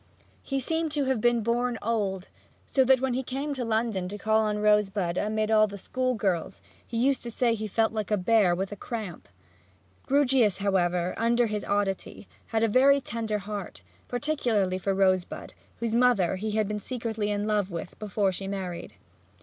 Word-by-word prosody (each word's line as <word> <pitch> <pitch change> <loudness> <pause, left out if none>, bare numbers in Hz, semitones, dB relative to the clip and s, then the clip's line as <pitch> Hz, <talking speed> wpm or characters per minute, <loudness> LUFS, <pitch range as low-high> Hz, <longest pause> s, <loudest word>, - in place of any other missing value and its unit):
He 275 -1 -2
seemed 320 +4 -1
to 290 -2 +1
have 260 -4 0
been 240 -1 +3
born 240 +1 0
old, 200 -4 -1 0.4
so 265 - +3
that 260 0 +5
when 265 -2 0
he 255 - 0
came 275 +3 -3
to 260 -3 -3
London 220 -5 -1
to 205 - -6
call 220 +1 +2
on 210 -1 0
Rosebud 210 -4 +2
amid 215 +2 0
all 215 -1 +5
the 200 0 -8
school 255 +5 -1
girls 180 - -1 0.3
he 235 - -4
used 265 +3 +2
to 240 - -6
say 235 0 +1
he 215 -1 -3
felt 220 +2 +1
like 215 -2 -3
a 210 - +2
bear 195 -2 +3
with 190 +2 -2
the - - -4
cramp. 210 -4 -6 0.8
Grewgious, 265 -7 +3
however, 180 -3 +1
under 235 +1 +2
his 210 -2 -3
oddity 200 0 -2 0.2
had 225 0 0
a - - +4
very 270 +5 +5
tender 225 -5 -3
heart, 205 -2 -6 0.2
particularly 235 -8 0
for 195 +1 -1
Rosebud, 185 -2 0 0.3
whose 230 -1 -2
mother 230 -7 +3
he 215 +2 -3
had 215 -1 +1
been 210 0 -3
secretly 225 -2 -3
in 205 0 -1
love 210 -3 0
with 170 -1 -7
before 205 -2 0
she 195 +1 -6
married. 185 - -5
215 Hz, 185 wpm, -27 LUFS, 195-240 Hz, 0.8 s, that